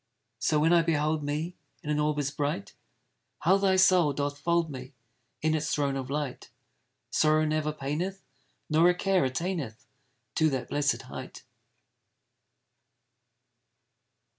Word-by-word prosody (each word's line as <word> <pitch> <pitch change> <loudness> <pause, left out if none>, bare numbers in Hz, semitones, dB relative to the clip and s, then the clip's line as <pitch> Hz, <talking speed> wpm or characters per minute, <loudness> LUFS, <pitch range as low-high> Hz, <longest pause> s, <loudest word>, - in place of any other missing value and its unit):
So 155 - +2
when 165 +3 +4
I 170 - +6
behold 155 -1 +1
me 150 +4 -2 0.3
In 150 - -3
an 150 - +1
orb 150 0 +1
as 145 -1 -1
bright, 145 -9 -3 0.7
How 185 +6 +4
thy 195 -1 +3
soul 185 -5 +5
doth 145 +1 -2
fold 170 0 +1
me 130 0 -8 0.5
In 155 0 +2
its 155 0 -1
throne 140 -2 0
of 130 -1 -4
light! 145 -2 -4 0.6
Sorrow 155 0 +3
never 155 0 0
paineth, 155 +7 -3 0.4
Nor 160 +3 +5
a 180 - +2
care 190 0 +2
attaineth 135 - -3 0.5
To 160 - +4
that 130 -3 -3
blessed 145 -1 0
height. - - -9
150 Hz, 135 wpm, -28 LUFS, 145-170 Hz, 0.7 s, I